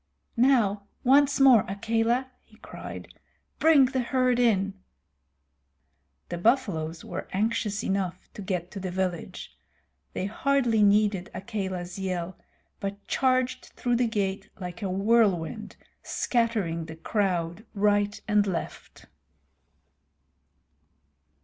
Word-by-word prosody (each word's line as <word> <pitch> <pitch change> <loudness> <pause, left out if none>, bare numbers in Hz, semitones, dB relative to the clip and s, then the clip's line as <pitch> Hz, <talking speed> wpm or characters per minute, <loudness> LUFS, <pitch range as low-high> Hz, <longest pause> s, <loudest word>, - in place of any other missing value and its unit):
"Now, 230 -6 +3 0.2
once 280 +2 +4
more, 260 -6 +7
Akela," 230 +5 0
he - - -23
cried. - - -9 0.5
"Bring 310 -4 +6
the 260 +1 -1
herd 255 0 +1
in." 200 -5 +2 1.6
The 175 - -4
buffaloes 175 - 0
were - - -6
anxious 215 +1 -1
enough 185 -2 -2
to - - -8
get 180 -2 -3
to 200 - -6
the 190 -1 -4
village. 180 -2 -4 0.6
They - - -2
hardly 240 +1 +1
needed 205 -2 +3
Akela's 190 -3 -4
yell, 185 -1 -3 0.4
but 200 0 -5
charged 255 -1 0
through 245 -1 0
the 245 0 +2
gate 200 -3 -2
like 180 +1 -7
a 195 - -2
whirlwind, 195 -3 +1 0.3
scattering 215 -9 -1
the 160 0 -9
crowd 175 0 -1
right 205 0 +2
and 210 -1 +3
left. 180 -3 -5
205 Hz, 110 wpm, -27 LUFS, 185-235 Hz, 1.6 s, more